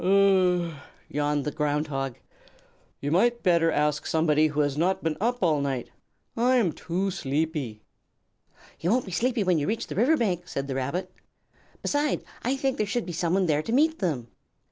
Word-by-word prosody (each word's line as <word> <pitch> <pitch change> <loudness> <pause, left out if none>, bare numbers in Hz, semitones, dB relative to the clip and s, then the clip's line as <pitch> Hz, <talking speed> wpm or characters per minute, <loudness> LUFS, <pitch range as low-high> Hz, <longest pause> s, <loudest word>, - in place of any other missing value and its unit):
"Ah 190 -1 +4
h 175 - 0
h," 170 -1 -5 0.4
yawned 145 -1 0
the 150 - -1
Ground 150 0 0
Hog. 135 -3 -3 0.8
"You 145 - -2
might 235 +8 +2
better 170 -2 +4
ask 150 0 0
somebody 155 -1 +3
who 150 0 0
has 145 -2 0
not 180 +5 +1
been 160 -1 0
up 240 0 0
all 155 -4 +3
night. 135 -3 -3 0.4
I 245 +3 +3
am 220 -9 +3
too 185 +5 -2
sleepy." 140 -7 -2 1.0
"You 170 - -1
won't 245 +4 +2
be 190 - -8
sleepy 235 +4 +1
when 180 -4 +2
you 145 - -2
reach 225 +2 -1
the - - -7
river 265 +10 +4
bank," 180 - -1
said 140 - -3
the 135 - -4
Rabbit. 165 +8 -3 0.7
"Beside, 290 0 0 0.2
I 255 +3 0
think 270 -1 -1
there 210 - 0
should 235 +3 -1
be 175 - -5
someone 175 +3 +1
there 150 -3 +2
to 225 - -5
meet 315 +6 +3
them." 140 - -2
175 Hz, 190 wpm, -26 LUFS, 150-210 Hz, 1.0 s, Ah